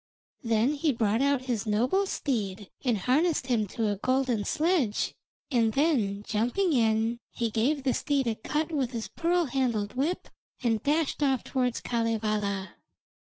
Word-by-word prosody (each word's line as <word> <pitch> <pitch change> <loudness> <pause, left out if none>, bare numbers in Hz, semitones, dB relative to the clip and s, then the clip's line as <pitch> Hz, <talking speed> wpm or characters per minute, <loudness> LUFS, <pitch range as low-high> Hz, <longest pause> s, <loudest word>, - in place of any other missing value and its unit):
Then 230 +4 +2
he 300 +1 +1
brought 225 -1 +1
out 280 -2 +2
his 235 -4 -2
noble 255 - +2
steed 210 - -3
and 245 -5 +2
harnessed 275 - +2
him 230 -5 +1
to 220 +2 -1
a 205 - -1
golden 255 -2 0
sledge, 310 - +1 0.4
and 230 -4 +2
then 235 -10 +1
jumping 245 - 0
in, 225 -1 +2
he 235 -2 -2
gave 265 +6 +1
the 260 -2 +2
steed 280 -3 0
a 230 - +1
cut 300 +9 -2
with 270 -5 -1
his 230 -2 -4
pearl 345 +1 +1
handled 240 -6 -1
whip, 295 +8 -1 0.4
and 225 -3 +1
dashed 300 +2 0
off 270 -4 +2
towards 250 -2 -1
Kalevala. 215 -4 -1
245 Hz, 155 wpm, -28 LUFS, 220-280 Hz, 0.4 s, Then